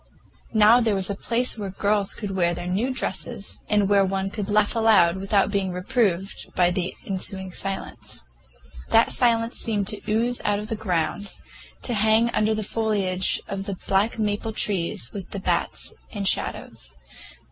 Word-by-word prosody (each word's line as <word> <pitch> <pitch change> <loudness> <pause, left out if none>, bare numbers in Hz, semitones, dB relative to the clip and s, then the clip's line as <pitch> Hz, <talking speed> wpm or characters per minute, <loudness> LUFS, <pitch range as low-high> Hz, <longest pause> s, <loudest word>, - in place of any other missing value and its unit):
Now 220 +3 +7
there 220 -3 +2
was 190 +1 0
a - - -2
place 235 +2 +1
where 200 -2 -3
the 190 - -11
girls 205 -1 +1
could 205 -3 -5
wear 175 -2 +1
their 175 - -5
new 195 +8 0
dresses, 200 -4 -3
and 210 -2 +3
where 200 -1 +4
one 195 0 -1
could 205 -1 -4
laugh 210 +2 +2
aloud 210 -6 +4
without 195 +1 +1
being 195 -2 0
reproved 195 -1 -1
by 180 -1 +4
the 180 0 -2
ensuing 190 -1 -3
silence. 195 - -5 0.7
That 225 +1 +4
silence 230 -1 +2
seemed 205 -4 0
to 210 - -1
ooze 235 +3 +1
out 205 -1 +1
of 210 +1 -6
the 225 - -1
ground, 200 0 -2 0.5
to 245 - -1
hang 220 +2 +3
under 215 0 +1
the 215 - -2
foliage 200 -4 0
of 195 0 -4
the 195 - -3
black 200 +4 +2
maple 215 +1 -1
trees 175 - -1
with 195 -3 -7
the 200 - -5
bats - - -1 0.2
and 200 -4 -2
shadows. - - -2
205 Hz, 170 wpm, -24 LUFS, 190-220 Hz, 0.7 s, Now